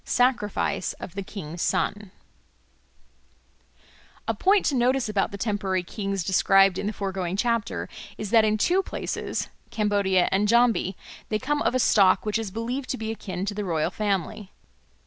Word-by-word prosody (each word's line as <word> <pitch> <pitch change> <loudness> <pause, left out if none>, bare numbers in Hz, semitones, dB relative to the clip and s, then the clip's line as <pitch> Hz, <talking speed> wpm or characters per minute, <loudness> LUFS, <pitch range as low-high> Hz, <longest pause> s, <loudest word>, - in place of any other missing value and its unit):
Sacrifice 220 -6 0
of 175 - -9
the 200 - -4
King's 170 -4 -7
Son 205 -1 -1 2.2
A 225 - +1
POINT 390 - +3
to 285 - +1
notice 255 0 +2
about 210 -2 0
the 200 - -7
temporary 200 -3 -1
kings 195 0 -3
described 195 +1 +4
in 205 - -2
the - - 0
foregoing 190 -3 -3
chapter 230 0 -1 0.3
is 210 -1 -5
that 225 -2 +6
in 215 0 +2
two 360 - +3
places - - -4 0.2
(Cambodia 200 -4 +2
and 200 +2 +2
Jambi) 230 -5 +3 0.3
they 215 - +1
come 290 +6 -1
of - - +1
a - - +3
stock 195 -5 +4
which 210 +1 0
is 220 -3 -4
believed 240 +6 -4
to 255 - -1
be 220 -1 -3
akin 195 -4 -5
to 205 - -2
the 210 +1 -3
royal 165 -5 0
family. 200 -1 -2
205 Hz, 165 wpm, -25 LUFS, 195-230 Hz, 2.2 s, that